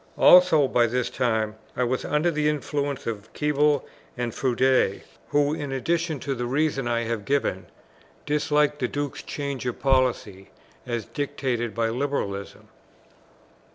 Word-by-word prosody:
Also 180 -6 +7
by 120 -2 +3
this 125 +1 -1
time 110 -4 0 0.2
I 125 - +2
was 125 +1 -1
under 155 +4 +1
the 150 -1 +1
influence 145 -2 -2
of 110 -2 -5
Keble 150 -1 +2 0.3
and 120 -2 -2
Froude; 130 -5 +2 0.3
who, 145 0 +2
in 145 -3 -4
addition 160 +3 -1
to 140 - -2
the 120 -1 -3
reasons 135 -1 0
I 115 0 +1
have 115 -2 -3
given, 135 -7 -1 0.6
disliked 150 0 +1
the 125 - 0
Duke's 145 0 -4
change 140 -2 -4
of 125 - -3
policy 125 -8 0 0.4
as 120 -3 -2
dictated 130 -5 -3
by 115 -1 +1
liberalism. 115 -6 -3
135 Hz, 140 wpm, -25 LUFS, 120-145 Hz, 0.6 s, Also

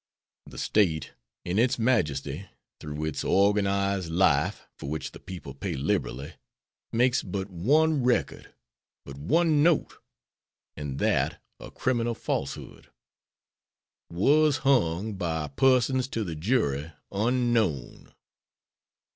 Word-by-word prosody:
The - - -12
State, 80 -8 +1 0.3
in 90 +4 0
its 125 +2 +3
majesty, 85 - 0 0.3
through 75 +1 -5
its 80 - -3
organized 100 -2 +2
life, 85 +1 +2 0.2
for 70 - -6
which 80 +1 -4
the - - -12
people 90 -7 -8
pay 70 - -4
liberally, 65 0 -2 0.6
makes 120 +2 +2
but 95 +1 -5
one 145 - +2
record, 125 0 0 0.5
but 70 - -9
one 155 - +2
note, 165 0 +2 0.8
and 75 -2 -5
that - - +1 0.2
a - - -9
criminal 120 -2 -1
falsehood, - - -5 1.2
"was 145 - +3
hung 110 -6 +2
by 80 -5 -3
persons 130 - +2
to 115 -4 -3
the 85 -5 -4
jury 80 - 0 0.2
unknown." 110 - 0
100 Hz, 110 wpm, -27 LUFS, 80-125 Hz, 1.2 s, its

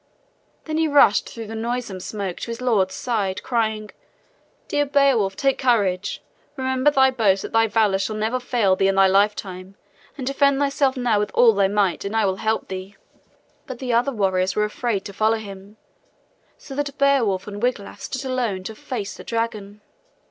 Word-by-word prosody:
Then 310 0 -2
he 320 - +2
rushed 285 -8 +4
through 230 -1 -8
the 220 - -8
noisome 230 -3 -3
smoke 195 -1 -5
to - - -6
his 230 0 -5
lord's 215 -7 +1
side, 205 -6 -2
crying: 220 -3 -1 0.8
"Dear 290 - +1
Beowulf, 275 -9 +2
take 270 +3 0
courage. 205 -7 0 0.3
Remember 260 +1 +2
thy 265 -2 +4
boast 205 -6 +2
that - - -6
thy 225 0 +3
valor 210 -3 +2
shall 215 +2 -2
never 220 +4 -1
fail 235 -6 +1
thee 195 - +2
in 195 - +1
thy 195 0 +5
lifetime, 195 -1 0 0.4
and 265 - -5
defend 275 +1 +2
thyself 275 -1 +1
now 240 -4 +1
with 210 0 -1
all 235 -2 +6
thy 200 -1 +2
might, 200 -3 0
and 200 +2 -4
I 220 -2 +3
will 190 -1 0
help 220 +2 -1
thee." 190 +1 -7 0.7
But 255 - -6
the 250 -1 -3
other 245 +4 +2
warriors 190 -5 0
were 210 - +2
afraid 210 -1 -2
to 200 - -7
follow 220 +3 +2
him, 200 -1 -10 0.8
so 275 - -11
that 285 +1 -3
Beowulf 255 -10 +2
and 205 0 -7
Wiglaf 245 -5 -2
stood 270 0 -5
alone 240 -8 -2
to 220 - -6
face 215 -2 -6
the - - -11
dragon. 215 -3 -4
220 Hz, 185 wpm, -22 LUFS, 200-255 Hz, 0.8 s, all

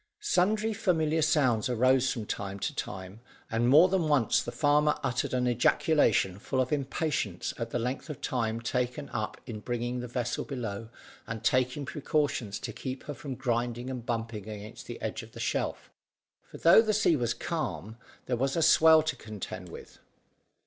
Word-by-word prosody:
Sundry 220 - +1
familiar 160 -6 +1
sounds 130 -8 +2
arose 130 +2 +3
from 115 -3 -4
time 100 -1 -4
to - - -3
time, 95 +2 -6 0.3
and 115 +2 +2
more 155 +7 +8
than 185 -4 +1
once 140 -7 +3
the - - -5
farmer 150 0 +3
uttered 125 -2 -1
an 125 -1 +1
ejaculation 120 - +2
full 130 - -2
of 130 -1 0
impatience 140 - -2
at 115 -1 -3
the 120 - -2
length 125 +6 -3
of 150 - -6
time 115 -2 -1
taken 125 +4 -2
up 110 -2 -4
in 115 -4 -6
bringing 120 +2 -3
the 125 - -5
vessel 120 0 -2
below 115 -6 -5 0.4
and 115 -1 -5
taking 130 +3 +1
precautions 135 -5 -1
to - - -6
keep 130 -1 -6
her 145 - -5
from 135 0 -6
grinding 120 0 -2
and 125 -2 -5
bumping 115 -3 -3
against 105 0 -9
the - - -7
edge - - -3
of - - -14
the - - -10
shelf, - - -2 0.6
for - - -10
though 170 +6 +7
the 215 -1 0
sea 190 -5 +4
was 120 -4 0
calm, 115 - -4 0.3
there 125 - 0
was 135 +3 0
the 165 - +2
swell 160 0 +7
to 160 - -1
contend 105 -3 -7
with. - - -11
125 Hz, 175 wpm, -29 LUFS, 115-150 Hz, 0.6 s, more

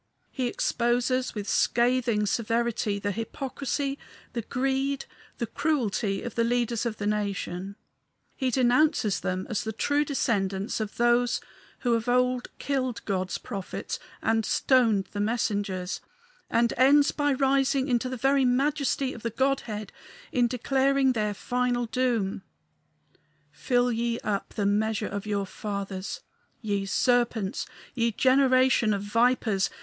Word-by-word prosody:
He 255 -2 -1
exposes 245 +2 0
with 205 -1 -4
scathing 240 -3 +2
severity 230 -1 0
the 205 0 -2
hypocrisy, 275 +5 -3 0.3
the 235 - -2
greed, 270 +3 -1 0.3
the 235 - -1
cruelty 230 -7 -1
of 240 - -5
the 230 - +1
leaders 235 0 0
of 220 -2 -4
the 205 - -4
nation; 200 -2 -2 0.6
he 260 -2 0
denounces 250 -3 +3
them 185 +1 -2
as 210 -3 -2
the 220 - -3
true 285 +7 +1
descendants 200 -9 -1
of 215 -1 -4
those 240 0 +3 0.4
who 240 -2 +2
of 230 +1 0
old 250 0 +2
killed 260 -4 -2
God's 185 -2 -1
prophets 195 -2 -5 0.2
and 225 0 +2
stoned 225 -6 +3
his 205 - -2
messengers, 205 -4 -1 0.5
and 235 0 +2
ends 280 +3 +5
by 290 -1 +1
rising 270 0 +2
into 250 -1 +1
the 255 - -4
very 270 +3 +3
majesty 270 +1 +1
of 235 - -10
the 230 - -2
Godhead 230 -4 -1 0.4
in 250 -6 +3
declaring 265 +2 +2
their 210 -3 -1
final 245 +2 0
doom: 230 -6 0 1.1
"Fill 245 -1 +1
ye 235 0 -1
up 200 -2 -3
the 205 - 0
measure 210 +1 +1
of 200 +1 -5
your 200 -1 0
fathers. 200 - -5 0.4
Ye 200 -3 -2
serpents! 240 -3 +1 0.3
Ye 235 -2 +1
generation 255 -3 +4
of 200 - -4
vipers! 225 -2 +2
235 Hz, 135 wpm, -27 LUFS, 210-255 Hz, 1.1 s, ends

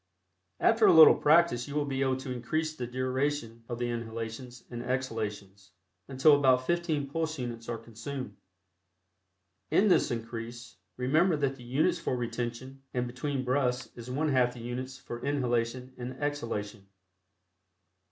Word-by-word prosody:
After 225 -1 +4
a - - +7
little 160 -1 +10
practice 155 -6 +3
you 145 - -6
will 150 -1 +1
be 135 -1 -2
able 130 -1 +1
to 130 0 -6
increase 155 +6 -2
the 125 -4 -4
duration 130 -1 -2
of 120 - -3
the 120 0 -1
inhalations 115 +2 -6
and 120 -1 -5
exhalations, 105 -6 -4 0.3
until 140 +3 +5
about 130 -2 +3
fifteen 165 -3 0
pulse 160 +2 -2
units 120 -2 -5
are 120 - -2
consumed. 115 +1 -7 1.3
In 210 +2 +4
this - - +4
increase, 115 0 -6 0.2
remember 155 +7 +3
that 140 -2 0
the 125 - -13
units 135 +7 +1
for 130 - -2
retention 120 +2 -4
and 125 0 +1
between 130 +2 -3
breaths 125 -1 0
is 120 0 -9
one 150 +5 0
half 125 -3 +2
the - - -9
units 130 +3 -5
for 120 -2 -8
inhalation 125 -2 -1
and 125 +1 -5
exhalation. 115 -8 -4
125 Hz, 150 wpm, -29 LUFS, 120-145 Hz, 1.3 s, little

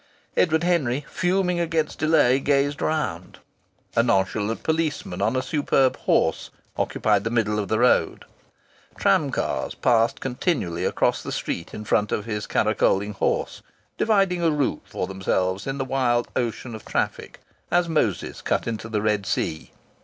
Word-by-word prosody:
Edward 160 -1 +2
Henry, 145 -6 +1
fuming 180 -1 0
against 165 -2 -1
delay, 145 -5 +4
gazed 145 +2 +1
around. 95 - -2 0.6
A 115 - +5
nonchalant 105 -1 0
policeman 160 - -1
on 115 - +1
a 130 - 0
superb 135 -3 +2
horse - - +1 0.3
occupied 105 -2 +1
the 115 - -1
middle 110 -2 0
of 100 - -2
the 110 - +1
road. 125 +2 +2 0.7
Tram - - +3
cars - - -2
passed 115 -1 +2
constantly 125 - -1
across - - +1
the - - -6
street 85 - -4
in 105 - -7
front 105 0 +1
of 105 - -1
his 105 -2 -4
caracoling 105 -1 +1
horse, 95 - -1 0.3
dividing 195 -5 +2
a 165 - +3
route 150 -3 0
for - - -4
themselves 95 +1 -1
in 135 0 -2
the 135 - -2
wild 125 -3 +1
ocean 120 0 -2
of 110 - -8
traffic - - -3 0.3
as 175 0 +2
Moses 135 - -1
cut - - 0
into 115 -1 -4
the 105 -2 -1
Red 105 -3 0
Sea. 80 -2 -2
120 Hz, 155 wpm, -24 LUFS, 105-155 Hz, 0.7 s, A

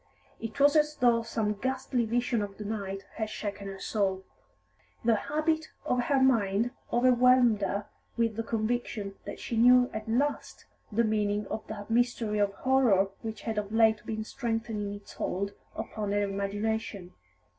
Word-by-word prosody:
It 225 +4 -6
was 285 +2 +5
as 300 0 +3
though 240 -3 +3
some 220 -2 -1
ghastly 255 +2 -1
vision 240 0 0
of 200 -1 -5
the 210 - -6
night 195 -2 -4
had 220 -1 -2
shaken 205 -2 -5
her 195 0 -6
soul. 190 -3 -1 0.8
The 230 - +5
habit 310 +7 0 0.2
of 250 0 +1
her 275 0 +3
mind 230 -3 +3 0.2
overwhelmed 245 -2 +5
her 200 +1 -1 0.3
with 230 -2 +1
the 230 - -1
conviction 220 -2 -2
that - - -7
she 235 - -4
knew 250 +2 +6
at 215 +1 -5
last 280 +6 -1 0.3
the 230 +3 +2
meaning 210 -1 0
of 220 - -4
that 210 0 -7
mystery 230 -3 +1
of 205 -1 +2
horror 245 -8 +3
which 220 -1 -6
had 220 -2 -2
of 205 0 -5
late 220 -1 +4
been 220 -1 -3
strengthening 225 -3 -3
its 205 0 -9
hold 200 +2 -2 0.2
upon 210 -2 -3
her 205 0 +2
imagination. 200 -1 -2
220 Hz, 160 wpm, -29 LUFS, 205-245 Hz, 0.8 s, knew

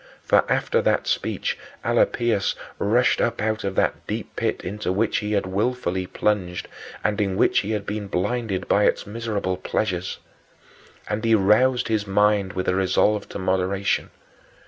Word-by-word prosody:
For - - +3
after 475 -1 +2
that - - +1
speech 485 - -1 0.3
Alypius 120 - +2 0.2
rushed 120 +5 +3
up 115 - 0
out 110 +1 -1
of 100 -1 -2
that - - 0
deep - - -5
pit - - -1
into 100 0 -3
which 105 +4 +1
he 105 0 -3
had 100 -2 +1
willfully 95 -2 -1
plunged 90 -5 -1 0.4
and 105 0 +1
in 95 -2 0
which - - +4
he 100 - -4
had 105 -2 -2
been 105 0 -4
blinded 100 0 -2
by 105 - +3
its - - +1
miserable 105 -4 -2
pleasures. 95 -1 -2 0.9
And 105 +1 -2
he 115 -1 +4
roused 110 +6 +3
his 110 -2 0
mind 105 -1 +2
with 95 - -3
a - - +3
resolve 95 +2 +2
to - - -6
moderation. 95 +1 0
105 Hz, 160 wpm, -23 LUFS, 95-110 Hz, 0.9 s, which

